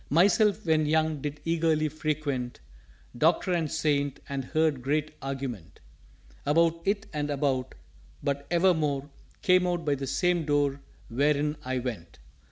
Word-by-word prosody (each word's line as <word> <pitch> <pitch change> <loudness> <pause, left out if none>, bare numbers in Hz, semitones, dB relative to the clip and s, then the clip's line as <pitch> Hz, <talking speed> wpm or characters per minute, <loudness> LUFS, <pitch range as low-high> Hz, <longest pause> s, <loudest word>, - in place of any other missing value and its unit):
"_Myself 200 +5 +4
when 155 -2 +3
young 155 -1 +1
did 145 +1 -5
eagerly 160 -2 +2
frequent 145 -5 -3 0.6
Doctor 170 +7 +2
and 165 -4 0
Saint, 145 -3 0
and 140 -1 -3
heard 155 -1 +1
great 150 +3 -1
argument 135 -10 -5 0.6
About 165 +2 +2
it 205 +2 0
and 150 -1 -2
about: 135 -3 -1 0.5
but 140 0 -2
evermore 160 -5 +2 0.3
Came 180 -1 +4
out 175 -2 -1
by 145 - +2
the 135 -1 -3
same 175 +4 +1
Door 145 -2 +1 0.3
where 140 +5 +2
in 150 +1 -1
I 130 -1 -2
went. 110 - -5
150 Hz, 140 wpm, -28 LUFS, 140-165 Hz, 0.6 s, Myself